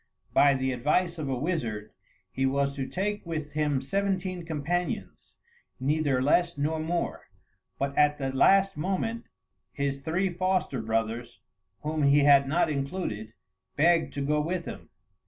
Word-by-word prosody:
By 140 Hz, -1 st, +5 dB
the 130 Hz, 0 st, 0 dB
advice 155 Hz, +7 st, 0 dB
of 145 Hz, -3 st, -3 dB
a 130 Hz, -, -1 dB
wizard, 120 Hz, -, -3 dB, 0.4 s
he 135 Hz, +6 st, 0 dB
was 140 Hz, +1 st, 0 dB
to 135 Hz, -2 st, -3 dB
take 205 Hz, +2 st, -2 dB
with 155 Hz, -3 st, -4 dB
him 150 Hz, -3 st, 0 dB
seventeen 190 Hz, -2 st, -1 dB
companions, 165 Hz, +2 st, -3 dB, 0.4 s
neither 140 Hz, -1 st, +1 dB
less 170 Hz, +3 st, +2 dB
nor 155 Hz, +3 st, 0 dB
more; 170 Hz, +2 st, -2 dB, 0.5 s
but 140 Hz, 0 st, -2 dB
at 150 Hz, 0 st, +4 dB
the 135 Hz, -2 st, -3 dB
last 195 Hz, +6 st, +4 dB
moment 195 Hz, +8 st, -2 dB, 0.5 s
his 140 Hz, -1 st, -2 dB
three 175 Hz, +6 st, 0 dB
foster 185 Hz, -8 st, 0 dB
brothers, 115 Hz, 0 st, -2 dB, 0.4 s
whom 155 Hz, +1 st, -1 dB
he 140 Hz, 0 st, +5 dB
had 140 Hz, -1 st, +6 dB
not 160 Hz, +5 st, +2 dB
included, 135 Hz, -, -3 dB, 0.4 s
begged 165 Hz, +2 st, +3 dB
to 140 Hz, -1 st, -2 dB
go 150 Hz, +1 st, +2 dB
with 170 Hz, +2 st, -2 dB
him. -, -, -8 dB
150 Hz, 145 wpm, -28 LUFS, 135-175 Hz, 0.5 s, had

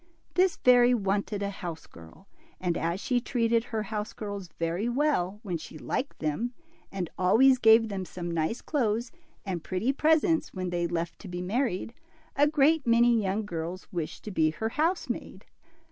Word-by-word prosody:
This 370 Hz, 0 st, +3 dB
fairy 245 Hz, 0 st, +5 dB
wanted 200 Hz, -1 st, -1 dB
a 200 Hz, -, -2 dB
house 175 Hz, -5 st, -7 dB
girl, 80 Hz, -, -15 dB, 0.3 s
and 175 Hz, -2 st, -1 dB
as 170 Hz, +3 st, -1 dB
she 245 Hz, +2 st, 0 dB
treated 230 Hz, -2 st, +1 dB
her 220 Hz, -3 st, -3 dB
house 210 Hz, 0 st, -4 dB
girls 200 Hz, -3 st, -6 dB
very 170 Hz, +7 st, -1 dB
well 240 Hz, -8 st, 0 dB
when 180 Hz, -5 st, -2 dB
she 155 Hz, 0 st, -10 dB
liked 260 Hz, -, -3 dB
them, 220 Hz, +11 st, -2 dB, 0.4 s
and 190 Hz, -3 st, -3 dB
always 255 Hz, +8 st, +5 dB
gave 225 Hz, 0 st, +6 dB
them 195 Hz, -3 st, -4 dB
some 175 Hz, 0 st, -6 dB
nice 165 Hz, +8 st, -1 dB
clothes 235 Hz, -5 st, -1 dB, 0.3 s
and 180 Hz, -4 st, -3 dB
pretty 200 Hz, +9 st, 0 dB
presents 320 Hz, -, +2 dB
when 185 Hz, -1 st, -3 dB
they 175 Hz, -1 st, 0 dB
left 170 Hz, +3 st, -4 dB
be 175 Hz, 0 st, -4 dB
married, 225 Hz, +1 st, -1 dB, 0.4 s
a 290 Hz, +1 st, +4 dB
great 300 Hz, -1 st, +3 dB
many 235 Hz, 0 st, +5 dB
young 200 Hz, +2 st, -1 dB
girls 175 Hz, 0 st, -5 dB
wished 165 Hz, -3 st, -4 dB
to 210 Hz, -, -6 dB
be 160 Hz, -4 st, +3 dB
her 220 Hz, +8 st, -3 dB
housemaid. 325 Hz, +9 st, -2 dB
210 Hz, 165 wpm, -28 LUFS, 180-245 Hz, 0.4 s, gave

